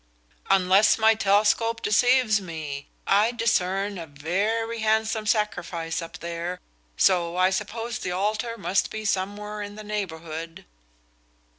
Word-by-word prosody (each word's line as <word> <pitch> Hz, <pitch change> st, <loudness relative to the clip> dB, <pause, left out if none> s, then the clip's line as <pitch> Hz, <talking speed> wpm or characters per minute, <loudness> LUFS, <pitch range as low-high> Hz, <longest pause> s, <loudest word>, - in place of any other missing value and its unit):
"Unless 195 Hz, +2 st, +5 dB
my 220 Hz, 0 st, +5 dB
telescope 215 Hz, +2 st, +2 dB
deceives 230 Hz, 0 st, +3 dB
me, 155 Hz, -5 st, -6 dB, 0.2 s
I 205 Hz, +3 st, +4 dB
discern 200 Hz, -4 st, 0 dB
a 165 Hz, -, -7 dB
very 205 Hz, +10 st, -2 dB
handsome 220 Hz, 0 st, 0 dB
sacrifice 175 Hz, -6 st, -1 dB
up 165 Hz, -, -8 dB
there, 170 Hz, +1 st, -5 dB, 0.4 s
so 175 Hz, -2 st, +2 dB
I 185 Hz, +1 st, +4 dB
suppose 225 Hz, +4 st, -3 dB
the -, -, -3 dB
altar 215 Hz, +5 st, -1 dB
must 190 Hz, -2 st, 0 dB
be 215 Hz, 0 st, -6 dB
somewhere 210 Hz, +1 st, -2 dB
in 205 Hz, 0 st, -7 dB
the 215 Hz, -, -9 dB
neighborhood." 165 Hz, -5 st, -5 dB
205 Hz, 125 wpm, -25 LUFS, 180-220 Hz, 0.4 s, Unless